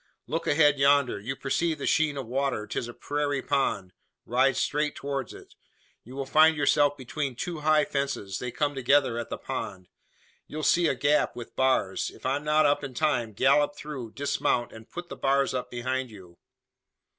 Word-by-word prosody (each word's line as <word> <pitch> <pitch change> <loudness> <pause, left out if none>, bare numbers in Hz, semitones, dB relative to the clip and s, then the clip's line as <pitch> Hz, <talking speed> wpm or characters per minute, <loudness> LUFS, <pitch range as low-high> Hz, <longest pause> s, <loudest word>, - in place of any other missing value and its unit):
Look 160 +6 -3
ahead 145 -1 +4
yonder. 140 -5 +3
You 125 +6 -4
perceive 160 +4 -1
the - - -5
sheen 155 -3 +2
of 135 - -4
water. 130 -2 -1
'Tis 115 - -4
a 120 - -8
prairie 145 -1 -2
pond. 100 -10 -1 0.3
Ride 130 +2 +2
straight 150 +2 0
towards 140 -3 -4
it. - - -13 0.5
You 125 +3 -12
will 135 0 -3
find 155 +3 +5
yourself 145 0 +3
between 135 0 -4
two 170 +6 -4
high 155 0 +3
fences. 140 -10 -3
They 125 - -4
come 145 +3 -1
together 135 -2 +2
at 115 - -5
the - - -4
pond. 95 -2 -6 0.6
You'll 155 +1 -6
see 170 +4 +4
a 135 - +1
gap, 145 +2 +2
with 120 -1 -9
bars. 130 -7 +1
If - - -15
I'm 135 +3 0
not 150 0 +3
up 145 0 +2
in 135 -3 -6
time, 125 -8 0
gallop 145 +6 +3
through, 135 -7 -7
dismount, 140 -3 0
and 110 0 -13
put 175 0 -8
the - - -6
bars 135 0 +1
up 125 -1 -3
behind 130 +1 -3
you." 90 -5 -14
140 Hz, 185 wpm, -27 LUFS, 125-145 Hz, 0.6 s, find